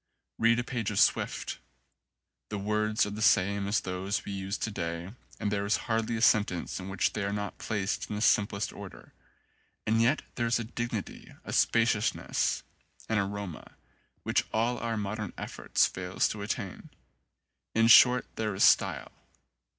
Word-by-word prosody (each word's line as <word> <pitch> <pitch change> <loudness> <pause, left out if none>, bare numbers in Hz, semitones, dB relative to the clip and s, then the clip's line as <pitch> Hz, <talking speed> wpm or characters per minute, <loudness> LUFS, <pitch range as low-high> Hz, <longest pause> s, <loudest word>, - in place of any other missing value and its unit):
Read 115 +1 +4
a 120 - 0
page 120 -4 -3
of 105 - -1
Swift: - - +1 0.9
the 105 - -3
words 105 +2 +1
are 105 - -5
the 105 +1 -6
same 100 0 +3
as 100 +1 +2
those 95 +2 -3
we - - -5
use 95 +1 -3
to 110 - -3
day 85 -1 -4 0.3
and 105 - -1
there 100 -1 0
is 100 +1 +2
hardly 115 0 0
a - - -4
sentence 100 -7 +2
in 95 +1 -7
which 95 -2 0
they 105 - -2
are 100 - -1
not 105 0 -4
placed 100 -2 -2
in 105 - -3
the 105 - -3
simplest 100 0 +2
order; - - -11 0.7
and 110 +1 +2
yet 125 +7 +2
there 120 -1 -1
is 115 - +2
a 120 - -3
dignity, 115 -2 -5
a - - -5
spaciousness, 115 -2 +1 0.5
an 110 -2 +2
aroma, 100 -4 -5 0.5
which - - +1
all 115 +3 0
our 115 -1 -2
modern 105 -1 -4
effort - - -8
fails 90 0 +2
to 105 - -5
attain: 100 -2 -5 0.9
in 115 0 +4
short 125 +1 +7
there 110 -3 -1
is 95 - +2
style. - - +3
105 Hz, 165 wpm, -29 LUFS, 100-115 Hz, 0.9 s, short